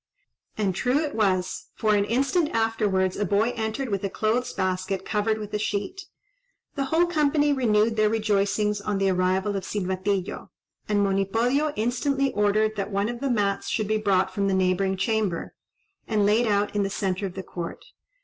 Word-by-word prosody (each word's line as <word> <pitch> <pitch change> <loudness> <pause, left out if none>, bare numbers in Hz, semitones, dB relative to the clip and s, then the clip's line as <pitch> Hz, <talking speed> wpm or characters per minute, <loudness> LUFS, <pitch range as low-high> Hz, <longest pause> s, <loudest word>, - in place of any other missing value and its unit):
And 200 -3 0
true 250 +8 +1
it 300 -1 -1
was; 190 -4 0
for 215 -1 +1
an 200 -1 +2
instant 275 - +1
afterwards, 210 -5 +1
a 205 - 0
boy 205 +5 +1
entered 225 +4 -3
with 200 -2 -2
a 200 - -1
clothes 225 +5 0
basket 185 0 -2
covered 215 +1 0
with 210 -1 -7
a 210 - 0
sheet. 215 - -3 0.7
The 275 -2 -1
whole 325 +5 +3
company 295 -3 +2
renewed 225 -4 +2
their 215 0 +4
rejoicings 210 -1 +1
on 205 0 -1
the 195 0 +2
arrival 185 +2 +1
of 195 - -3
Silvatillo, 190 -1 -2 0.4
and 205 -1 +2
Monipodio 225 +10 +1
instantly 270 +5 0
ordered 210 +1 +2
that 200 0 -2
one 200 +1 0
of 240 0 -5
the 275 +1 -1
mats 205 -4 0
should 215 -3 -1
be 215 +1 +1
brought 190 -3 +1
from 200 +1 0
the 195 - +1
neighbouring 190 +1 +1
chamber, 205 -3 -1 0.5
and 210 -2 +2
laid 220 +4 +3
out 205 0 +1
in 205 - +2
the 195 - 0
centre 195 0 -2
of 180 - -10
the 190 - -5
court. 175 -1 -7
210 Hz, 180 wpm, -25 LUFS, 195-225 Hz, 0.7 s, their